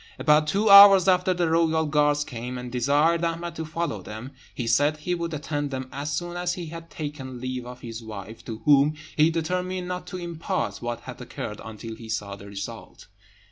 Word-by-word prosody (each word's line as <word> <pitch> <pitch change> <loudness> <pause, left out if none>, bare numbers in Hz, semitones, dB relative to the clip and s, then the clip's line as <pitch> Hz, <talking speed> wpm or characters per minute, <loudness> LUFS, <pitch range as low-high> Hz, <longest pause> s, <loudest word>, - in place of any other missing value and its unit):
About 150 0 +4
two 205 +6 +1
hours 200 -2 +10
after 185 0 +4
the 175 -2 +1
royal 160 -1 +2
guards 150 -1 +2
came, 125 -1 -6
and 125 0 -7
desired 145 +7 +2
Ahmed 170 0 -2
to 160 - -5
follow 160 - -3
them. 110 +7 -8 0.2
He 120 - -3
said 145 +6 +3
he 165 +4 -2
would 170 -1 -3
attend 145 -1 -3
them 130 -1 -5
as 145 +2 -4
soon 175 +3 -3
as 175 0 -1
he 175 - -5
had 165 +1 -9
taken 140 -5 -6
leave 130 -1 -4
of 125 0 -10
his 115 -1 -7
wife, 110 0 -9
to 110 -1 -7
whom 145 +1 +5 0.2
he 155 +1 +5
determined 180 +2 -2
not 180 0 -5
to 185 - -6
impart 170 -2 -3
what 120 -1 -4
had - - -9
occurred 105 - -6
until 110 +1 -8
he 115 0 -11
saw 105 -3 -3
the 100 0 -12
result. 100 0 -8
150 Hz, 200 wpm, -25 LUFS, 120-170 Hz, 0.2 s, hours